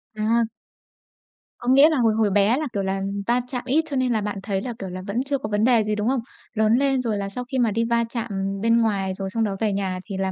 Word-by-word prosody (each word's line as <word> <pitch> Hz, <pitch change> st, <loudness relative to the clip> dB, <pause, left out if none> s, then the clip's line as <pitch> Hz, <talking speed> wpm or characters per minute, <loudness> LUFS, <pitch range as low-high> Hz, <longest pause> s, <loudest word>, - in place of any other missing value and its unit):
À! 225 Hz, +1 st, +1 dB, 1.1 s
Có 245 Hz, -, -8 dB
nghĩa 275 Hz, +4 st, +7 dB
là 315 Hz, -, +1 dB
hồi 230 Hz, -3 st, +3 dB
hồi 220 Hz, -1 st, +2 dB
bé 205 Hz, +5 st, +3 dB
là, 305 Hz, 0 st, -2 dB
kiểu 200 Hz, -, -1 dB
là, 195 Hz, 0 st, -1 dB, 0.3 s
va 240 Hz, +1 st, +2 dB
chạm 250 Hz, -1 st, -4 dB
ít 295 Hz, +6 st, +2 dB
cho 280 Hz, -, -3 dB
nên 255 Hz, -1 st, +1 dB
là 220 Hz, -, 0 dB
bạn 205 Hz, -1 st, -3 dB
thấy 195 Hz, -2 st, -1 dB
là, 245 Hz, +3 st, -4 dB
kiểu 195 Hz, -, -5 dB
là, 185 Hz, +1 st, -6 dB
vẫn 230 Hz, +6 st, -1 dB
chưa 275 Hz, 0 st, -1 dB
có 215 Hz, -, -5 dB
vấn 210 Hz, 0 st, +1 dB
đề 240 Hz, -3 st, +4 dB
gì, 210 Hz, 0 st, -1 dB
đúng 210 Hz, +1 st, -1 dB
không? 265 Hz, +1 st, +2 dB, 0.3 s
Lớn 220 Hz, -1 st, +2 dB
lên 270 Hz, -1 st, +2 dB
rồi 225 Hz, -4 st, -1 dB
là 200 Hz, 0 st, -3 dB
sau 250 Hz, +5 st, -5 dB
khi 265 Hz, -, -1 dB
mà 235 Hz, -3 st, +2 dB
đi 230 Hz, +3 st, 0 dB
va 235 Hz, 0 st, +2 dB
chạm 235 Hz, -1 st, -4 dB, 0.3 s
bên 230 Hz, +1 st, +3 dB
ngoài, 195 Hz, -4 st, 0 dB
rồi 195 Hz, 0 st, -5 dB
xong 225 Hz, +3 st, -1 dB
đó 200 Hz, -3 st, -1 dB
về 215 Hz, -2 st, +1 dB
nhà 190 Hz, -2 st, -2 dB
thì 195 Hz, -3 st, -5 dB
là 190 Hz, 0 st, -1 dB
220 Hz, 280 wpm, -23 LUFS, 200-250 Hz, 1.1 s, nghĩa